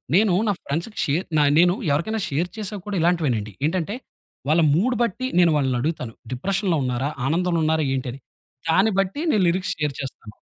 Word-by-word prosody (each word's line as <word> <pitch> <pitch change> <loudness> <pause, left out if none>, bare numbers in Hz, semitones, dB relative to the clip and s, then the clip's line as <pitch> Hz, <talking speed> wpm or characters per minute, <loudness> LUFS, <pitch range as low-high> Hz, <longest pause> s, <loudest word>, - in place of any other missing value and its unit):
నేను 200 -1 +4
నా 205 - +3
ఫ్రెండ్స్‌కి 170 +10 -3
షేర్ 155 +6 0 0.3
నేను 175 +1 +5 0.2
ఎవరికైనా 205 +9 0
షేర్ 165 +6 -1
చేశాక 210 -1 -4
కూడా 200 -2 -2
ఇలాంటివేనండి. 145 -12 +1 0.2
ఏంటంటే, 185 +4 -2 0.5
వాళ్ల 165 +2 +4
మూడ్ 240 +9 +2
బట్టి 235 +3 -2
నేను 170 -2 +5
వాళ్లని 130 -3 +1
అడుగుతాను. 135 -6 -3 0.2
డిప్రెషన్‌లో 185 - 0
ఉన్నారా, 125 +4 -1 0.2
ఆనందంలో 170 +2 +1
ఉన్నారా, 160 -1 +2
ఏంటి 130 -1 -3
అని. 135 - -10 0.5
దాన్ని 190 +7 +4
బట్టి 195 +8 -4
నేను 210 -7 +3
లిరిక్స్ 185 +2 0
షేర్ 150 -3 -1
చేస్తాను. 115 -5 -9
170 Hz, 165 wpm, -23 LUFS, 145-190 Hz, 0.5 s, నేను